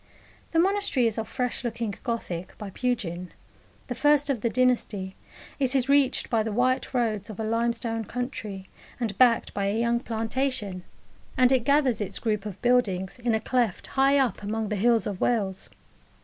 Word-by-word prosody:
The 330 - -2
Monastery 385 -7 +2
is 225 -1 0
of 220 - -4
fresh 250 -2 -2
looking 230 -3 -3
Gothic, 185 -8 -4
by 205 -2 -7
Pugin 185 -8 -2 0.6
the - - -4
first 290 -1 +3
of 245 -6 -2
the 235 - +1
dynasty: 225 -6 0 0.4
it 265 -1 +2
is 265 0 +2
reached 280 -2 +3
by 225 -2 +1
the 220 0 -2
white 255 +4 +1
roads 225 -5 -1
of 215 - -8
a - - -1
limestone 230 0 -1
country, 215 -6 -5 0.3
and 225 -5 -2
backed 245 -3 +4
by 200 -1 -1
a 205 +3 0
young 235 0 +2
plantation, 225 -4 -2 0.5
and 255 0 +5
it 255 -3 +2
gathers 280 -5 +3
its 205 - -3
group 215 -2 -1
of 200 -2 -8
buildings 220 -5 +1
in 240 -2 +1
a - - +1
cleft 235 -3 0
high 275 +1 +4
up 255 -8 +1
among 215 +1 -2
the 210 - -1
hills 230 +3 +3
of 200 -3 -4
Wales. 195 -5 0
230 Hz, 175 wpm, -26 LUFS, 210-255 Hz, 0.6 s, and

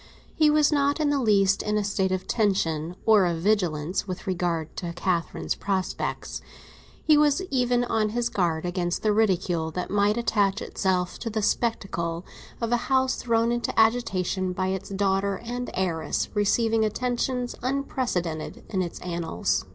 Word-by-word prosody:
He 310 -1 +4
was 300 0 +4
not 285 0 +2
in 300 -2 +2
the 280 -2 +1
least 200 -4 +3
in 210 0 0
a 210 - +1
state 195 -1 0
of 185 0 -2
tension 175 -6 0
or 210 -4 +5
of 170 -1 -1
vigilance 180 -3 0
with 185 +1 -5
regard 175 -4 -2
to 170 -2 -4
Catherine's 175 -1 -1
prospects; 190 -2 -3 0.6
he 305 -1 +5
was 300 +4 +3
even 245 -2 +2
on 220 -3 0
his 235 +2 0
guard 170 -3 0
against 175 -1 -2
the 215 -1 +3
ridicule 185 -6 +1
that 180 +3 -4
might 205 +2 +2
attach 210 -3 +1
itself 180 -2 -1
to 230 - -3
the 215 -1 -2
spectacle 175 -7 -1 0.3
of 230 -1 -2
a 240 - +4
house 260 -1 +2
thrown 230 -1 +1
into 240 -1 -1
agitation 190 -5 +1
by 185 +1 -1
its 190 0 -3
daughter 195 0 0
and 245 +1 -4
heiress 165 -5 -1
receiving 220 +2 +2
attentions 245 +2 -1
unprecedented 240 - -2
in 190 - 0
its 175 -2 -4
annals. 170 - -1
200 Hz, 160 wpm, -26 LUFS, 180-235 Hz, 0.6 s, or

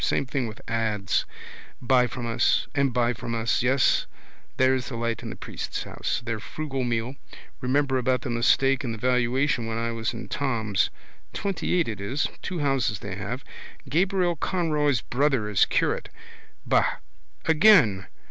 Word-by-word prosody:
Same - - +1
thing 130 -2 -2
with 110 0 -11
ads. 110 -3 0 0.5
Buy 125 0 +3
from 120 +1 -6
us. 115 -1 +2
And 140 -2 +2
buy 120 0 +1
from 115 0 -5
us. 115 0 +1
Yes, 130 +1 +3 0.5
there's 130 -1 +2
the 125 - -5
light 115 -1 -2
in - - -6
the - - -6
priest's - - -5
house. 115 - -3
Their 115 -2 -2
frugal 135 +3 -4
meal. 120 +2 -2 0.4
Remember 135 +1 +1
about 125 0 +1
the 125 - -3
mistake 135 +3 +3
in 120 -3 -2
the - - -6
valuation 125 +1 +1
when 115 0 -2
I 115 0 -1
was 115 -1 -2
in 120 0 -7
Thom's. 110 -8 0 0.5
Twentyeight 180 -3 0
it 105 -3 -4
is. 130 +9 -1
Two 185 - -4
houses 135 -7 +1
they 90 - -6
have. 125 +7 -5 0.4
Gabriel 180 +4 +1
Conroy's 150 - +1
brother 135 -3 +1
is 105 -2 +4
curate. - - 0 0.6
Ba. - - +2 0.5
Again. 155 - +5
125 Hz, 155 wpm, -26 LUFS, 115-140 Hz, 0.6 s, Again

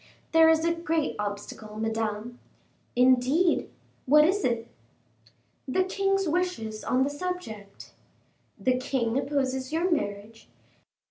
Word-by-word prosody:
"There 325 0 +6
is 320 0 +3
a 335 - +2
great 330 -2 -1
obstacle, 210 +1 -6
Madame." 225 +1 -3 0.6
"Indeed! 260 +7 +3 0.4
what 300 +3 +7
is 390 +5 +1
it?" 235 -2 0 1.0
"The 370 +8 +2
king's 390 0 0
wishes 310 -11 -2
on 255 +1 +2
the 275 - 0
subject." 290 - -6 0.7
"The 255 0 +1
king 255 -3 -1
opposes 265 -1 -1
your 340 +4 0
marriage?" 215 -6 -3
265 Hz, 115 wpm, -27 LUFS, 225-330 Hz, 1.0 s, what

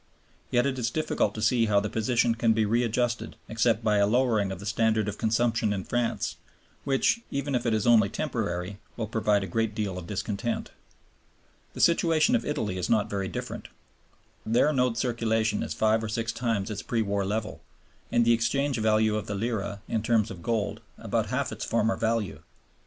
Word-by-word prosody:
Yet 120 +1 +2
it 135 -2 -1
is 120 -1 0
difficult 155 -7 0
to 110 - -4
see 115 0 +3
how 100 -1 +4
the 105 - -2
position 115 +2 +1
can 115 0 +2
be 110 -1 +2
readjusted 120 +2 0
except 115 0 +1
by 105 -1 +3
a 100 0 +4
lowering 110 -4 +2
of 95 - -6
the 100 - -9
standard 110 0 +1
of 105 - -4
consumption 115 -1 +1
in 100 -2 -2
France, 120 +2 -1 0.5
which, 140 - +2
even 140 0 -2
if 120 -1 0
it 115 - +2
is 105 - -1
only 110 -4 +5
temporary, 100 - -3 0.2
will 115 - -2
provoke 105 -2 +1
a - - -2
great 110 +3 -1
deal 100 -5 -2
of 85 - -10
discontent. 105 +3 -3 1.0
The - - -4
situation 170 +6 +4
of 240 - +1
Italy 110 -11 -2
is 90 - -2
not 105 -3 +2
very 100 -1 -2
different. - - -6 0.8
There 115 +2 +3
the - - 0
note 125 -3 +1
circulation 115 -3 0
is - - -3
five 110 +1 +2
or 110 - -3
six 115 0 -2
times 115 -4 -1
its 105 - -4
pre 115 -2 -1
war 100 -1 -1
level, 105 +2 -3 0.5
and 120 0 +3
the 115 - +5
exchange 135 +3 0
value 110 0 +3
of 105 - -3
the 100 - -3
lira 100 -2 -3
in 110 - -1
terms 110 -1 +1
of 90 -3 -9
gold 110 -2 -1 0.2
about - - -1
half - - -1
its - - -5
former 115 -1 +1
value. 115 -3 -1
110 Hz, 195 wpm, -27 LUFS, 105-120 Hz, 1.0 s, only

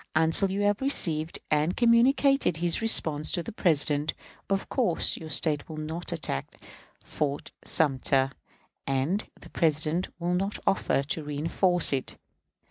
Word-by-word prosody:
Until 160 +5 +2
you 195 +2 -2
have 205 +2 +1
received 165 - +1
and 155 +4 +1
communicated 245 - +3
his 170 +3 +1
response 155 -9 +2
to 175 - 0
the - - -7
President, 150 -6 +1 0.3
of 195 0 -1
course 225 -11 +1
your 160 - -9
State 150 +1 +1
will 155 - -7
not 160 +3 -5
attack 155 - -3 0.5
Fort 145 -1 -4
Sumter, 135 -2 +2 0.6
and 135 +10 0
the - - -15
President 160 +2 0
will 175 0 -2
not 195 +3 -1
offer 160 -7 +1
to 150 +3 -3
reënforce 160 +4 +2
it. 130 - -3
160 Hz, 135 wpm, -27 LUFS, 150-195 Hz, 0.6 s, communicated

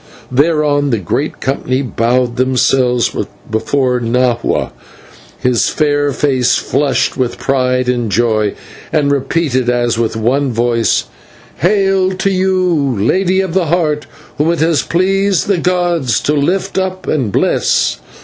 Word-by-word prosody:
Thereon 145 0 +2
the 115 -4 0
whole 140 - -1
company 135 0 -1
bowed 120 0 0
themselves 130 -1 +1 0.4
before 125 +3 0
Nahua, 120 0 0 0.7
whose 125 -2 +2
fair 145 -2 +1
face 130 -2 +1
flushed 135 -3 0
with 125 -2 -1
pride 125 0 0
and 120 -3 -1
joy, 110 -2 +1 0.4
and 150 -3 +1
repeated, 135 -2 0
as 120 -1 0
with 115 -1 -1
one 130 +5 0
voice: 115 0 +1 0.5
"Hail! 195 0 +2
to 190 +1 -1
you, 185 - +1
Lady 185 - +1
of 190 -3 -4
the 180 -3 +1
Heart, 150 -3 0 0.3
whom 150 +2 +2
it 170 - -2
has 160 -4 +2
pleased 195 +2 +1
the 200 -3 +1
gods 175 -9 0
to 150 - 0
lift 185 +7 0
up 185 0 -3
and 130 -9 -1
bless. - - +1
140 Hz, 130 wpm, -14 LUFS, 125-170 Hz, 0.7 s, Thereon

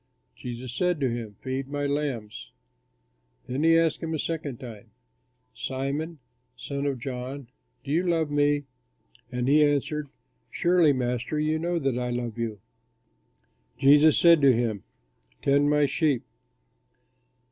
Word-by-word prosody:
Jesus 125 0 -7
said 180 +2 0
to 130 -3 +1
him, 115 -3 -5
"Feed 130 0 -3
my 145 0 -3
lambs." 140 -7 -3 1.0
Then 130 +3 -3
he 165 0 +5
asked 165 -1 +1
him 165 -1 -2
a - - -1
second 150 -5 -4
time, 115 -3 -10 0.6
"Simon, 140 +7 -3 0.4
son 140 0 -3
of 140 -2 -1
John, 130 +1 -6 0.3
do 140 - -6
you 165 +4 +3
love 165 -4 0
me?" 145 0 +2 0.7
And 125 0 -2
he 150 +2 +5
answered, 145 0 0 0.4
"Surely, 175 -3 +3
Master, 125 +2 -1
you 155 +1 0
know 170 +1 -1
that 135 -5 -1
I 125 0 -2
love 120 -1 -4
you." 110 -3 -3 1.2
Jesus 145 +3 +6
said 170 -3 +6
to 140 -1 +7
him, 115 -4 -1 0.6
"Tend 140 +1 +3
my 150 0 +3
sheep." 145 -3 +1
140 Hz, 135 wpm, -26 LUFS, 125-155 Hz, 1.2 s, to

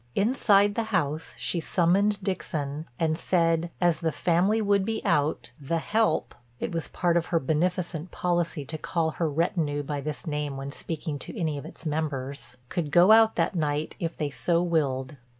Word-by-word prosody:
Inside 205 -2 +4
the 230 +2 -1
house 155 -5 -1
she 175 - -1
summoned 195 +5 +2
Dixon 155 -5 -3
and 160 -1 +2
said 165 -1 +1
as 175 -3 +2
the 165 -1 0
family 180 +7 +2
would 200 -2 +2
be 220 +2 -2
out 150 -2 +1
"the 165 +5 -1
help"—it 155 - -1
was 165 -2 -3
part 175 -1 +1
of 170 - 0
her 170 - +2
beneficent 170 +3 -1
policy 175 -5 -1
to 155 +3 -5
call 165 -1 0
her 165 0 -1
retinue 150 -1 0
by 145 0 -3
this 150 +3 -5
name 150 -3 -2
when 135 +1 -5
speaking 155 -1 -4
to 210 - -7
any 160 -4 0
of 140 - -6
its - - -14
members—could 145 0 -3
go 175 +6 +6
out 225 0 +6
that - - +1
night 150 -3 -1
if 165 -1 -3
they 150 -2 -2
so 170 +4 +1
willed. 140 -5 0
165 Hz, 170 wpm, -27 LUFS, 145-180 Hz, -, go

